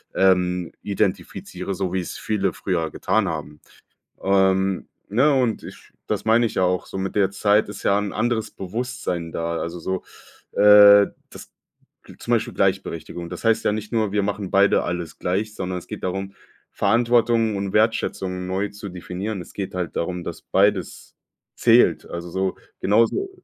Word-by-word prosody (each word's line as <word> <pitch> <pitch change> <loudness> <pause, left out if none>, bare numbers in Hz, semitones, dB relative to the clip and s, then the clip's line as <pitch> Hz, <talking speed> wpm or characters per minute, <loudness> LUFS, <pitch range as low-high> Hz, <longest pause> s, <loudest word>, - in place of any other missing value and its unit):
ähm, 90 -2 +2
identifiziere, 100 -1 -3
so 95 -1 -3
wie 95 - +1
es 85 - -7
viele 100 -4 -1
früher 85 -4 -2
getan 110 -3 0
haben. 75 -2 -6 0.6
Ähm, 95 -1 +2 0.2
ne? 130 +9 +3
Und 125 -5 +1
ich - - -12
das - - -2
meine 115 +2 +4
ich - - -8
ja - - +2
auch. 90 0 0
So - - -7
mit 95 0 -3
der 100 -2 +3
Zeit 105 +1 +2
ist 105 - -8
ja 100 - +3
'n 105 -1 -3
anderes 115 0 -1
Bewusstsein 95 -4 -4
da? 85 0 -2
Also 85 +1 -4
so, 95 +2 -3 0.6
äh, 105 -1 +8 0.2
dass - - -12 0.7
zum - - -5
Beispiel - - 0
Gleichberechtigung. 85 +1 -2
Das 90 - -8
heißt 115 -1 +3
ja - - +3
nicht 105 0 -5
nur, 110 -3 +1
wir 105 -1 +1
machen 100 -1 -3
beide 100 +1 +4
alles 85 -2 -4
gleich, 100 +4 -1
sondern 90 0 -3
es - - -15
geht - - -7
darum, 95 +1 -3 0.4
Verantwortung 115 0 +2
und 100 -1 -3
Wertschätzung 95 -4 0
neu 95 +2 -1
zu 100 0 -9
definieren. 90 +3 -5
Es - - -13
geht 95 -2 -5
halt 90 -2 -3
darum, 90 +1 -2
dass - - -7
beides - - 0 0.4
zählt. - - +4
Also 85 0 -6
so, 95 +1 -1 0.3
genauso, 115 - +2
95 Hz, 165 wpm, -22 LUFS, 90-105 Hz, 0.7 s, äh